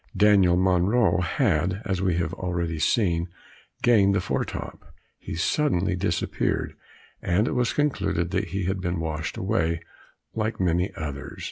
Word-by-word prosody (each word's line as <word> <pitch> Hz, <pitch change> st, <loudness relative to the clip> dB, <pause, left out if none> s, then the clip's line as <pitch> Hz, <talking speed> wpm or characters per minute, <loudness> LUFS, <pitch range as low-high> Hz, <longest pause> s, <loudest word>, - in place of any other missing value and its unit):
Daniel 100 Hz, -3 st, +5 dB
Monro, 95 Hz, +5 st, +3 dB
had, 90 Hz, +1 st, +1 dB
as 95 Hz, -3 st, -1 dB
we 95 Hz, -3 st, +1 dB
have 85 Hz, 0 st, -1 dB
already 85 Hz, -3 st, -3 dB
seen, 85 Hz, -2 st, +1 dB, 0.6 s
gained 100 Hz, -5 st, +4 dB
the -, -, +3 dB
fore 90 Hz, -, -1 dB
top. -, -, -8 dB, 0.3 s
He -, -, -6 dB
suddenly 95 Hz, -, +1 dB
disappeared, 90 Hz, -2 st, -1 dB, 0.5 s
and 100 Hz, +6 st, +1 dB
it -, -, -1 dB
was 125 Hz, -1 st, +1 dB
concluded 125 Hz, -, 0 dB
that -, -, 0 dB
he 95 Hz, +3 st, -3 dB
had 95 Hz, +1 st, -1 dB
been 90 Hz, -2 st, -2 dB
washed 80 Hz, -1 st, -3 dB
away 85 Hz, -4 st, 0 dB, 0.5 s
like 110 Hz, 0 st, -2 dB
many 90 Hz, 0 st, +1 dB
others. 70 Hz, -3 st, -6 dB
90 Hz, 145 wpm, -25 LUFS, 85-100 Hz, 0.6 s, Daniel